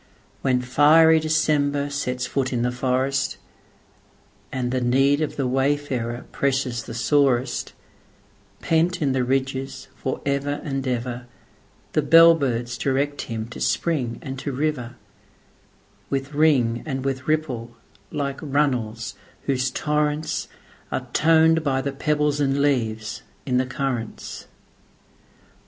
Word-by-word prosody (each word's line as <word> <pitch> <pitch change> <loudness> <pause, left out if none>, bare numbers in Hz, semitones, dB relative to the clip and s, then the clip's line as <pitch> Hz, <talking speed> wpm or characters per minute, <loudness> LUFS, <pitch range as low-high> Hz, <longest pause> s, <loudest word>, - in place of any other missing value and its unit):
When 125 -2 +1
fiery 160 +5 +6
December 145 -2 +1
sets 125 -3 -2
foot 135 -2 -1
in 120 -2 0
the 125 - +1
forest, 130 +2 0 1.1
And 125 -2 -2
the 130 0 0
need 135 +4 +3
of 155 - -2
the 135 - -1
wayfarer 130 -2 -1
presses 130 -3 0
the 115 - -7
sorest, 135 0 +1 0.9
Pent 170 +3 +1
in 140 - +2
the 130 -1 +1
ridges 135 +1 -2
for 130 - -3
ever 140 +1 -1
and 135 -2 -3
ever, 125 0 -3 0.7
The 155 - +3
bell 165 +3 +8
birds 125 -5 -2
direct 140 +1 0
him 110 -1 -3
to - - -9
spring 130 -9 0
and 135 0 -5
to 140 - -3
river, 130 -3 -2 1.1
With 135 +1 -2
ring 135 -6 +3
and 135 -3 -4
with 135 -1 -2
ripple, 125 -7 -2 0.3
like 140 -2 -3
runnels 125 -8 -1 0.3
whose 130 -1 0
torrentsAre 150 -3 -3
toned 160 0 +4
by 135 -3 +1
the 140 +1 -2
pebbles 150 +1 0
and 140 -1 +1
leaves 115 -5 0 0.2
in 125 -2 +1
the 130 0 +1
currents. 130 -4 -4
135 Hz, 125 wpm, -23 LUFS, 125-145 Hz, 1.1 s, bell